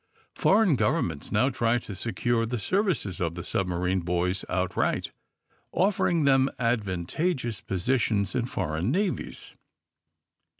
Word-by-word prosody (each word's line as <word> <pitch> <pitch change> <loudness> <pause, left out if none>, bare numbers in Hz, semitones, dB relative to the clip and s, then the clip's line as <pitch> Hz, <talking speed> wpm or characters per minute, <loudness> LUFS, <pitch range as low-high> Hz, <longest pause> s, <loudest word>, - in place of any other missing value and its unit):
Foreign 205 -4 +4
govern 150 +5 +2
ments 70 -3 -9
now 120 +6 +3
tried 120 -1 +1
to 100 - -7
secure 115 +3 0
the 120 +2 -2
services 160 - 0
of 85 -1 -1
the 90 - -5
submarine 90 0 0
boys 90 +2 -1
outright, 90 -1 0 0.6
offering 180 -4 +2
them 135 -1 +4
advan 105 -8 0
tageous 130 - -2
positions 100 0 0
in 125 -1 0
foreign 85 -3 -2
navies. 185 +5 -2
115 Hz, 125 wpm, -27 LUFS, 90-135 Hz, 0.6 s, Foreign